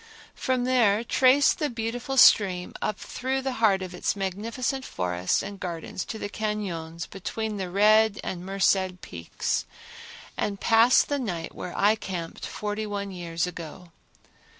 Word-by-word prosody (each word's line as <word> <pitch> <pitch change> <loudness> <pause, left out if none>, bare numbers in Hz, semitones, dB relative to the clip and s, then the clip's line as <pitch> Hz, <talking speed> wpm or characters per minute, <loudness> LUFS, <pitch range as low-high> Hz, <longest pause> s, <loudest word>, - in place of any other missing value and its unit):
From 255 -2 -1
there 235 -4 +3
trace 265 +4 +4
the 300 - -2
beautiful 235 +3 -4
stream 185 -7 +5
up 210 - -1
through 265 +1 -3
the 265 - -1
heart 195 -4 +4
of 185 -1 -7
its 180 - -1
magnificent 225 +7 -3
forests 90 - -1
and 200 0 -7
gardens 175 0 -5
to 220 - -6
the 205 - -4
cañons 190 -7 -4
between 215 +2 -4
the 190 -2 -3
Red 215 +2 +4
and 175 -1 -4
Merced 190 -1 +1
Peaks, 85 -1 -3 0.7
and 200 -1 -2
pass 230 +2 +5
the 285 -1 -2
night 175 -10 -4
where 180 - -7
I 205 +2 +5
camped 180 -6 -5
forty 210 +1 -4
one 200 -1 -4
years 170 -2 -2
ago. 170 0 -8
200 Hz, 150 wpm, -26 LUFS, 180-225 Hz, 0.7 s, stream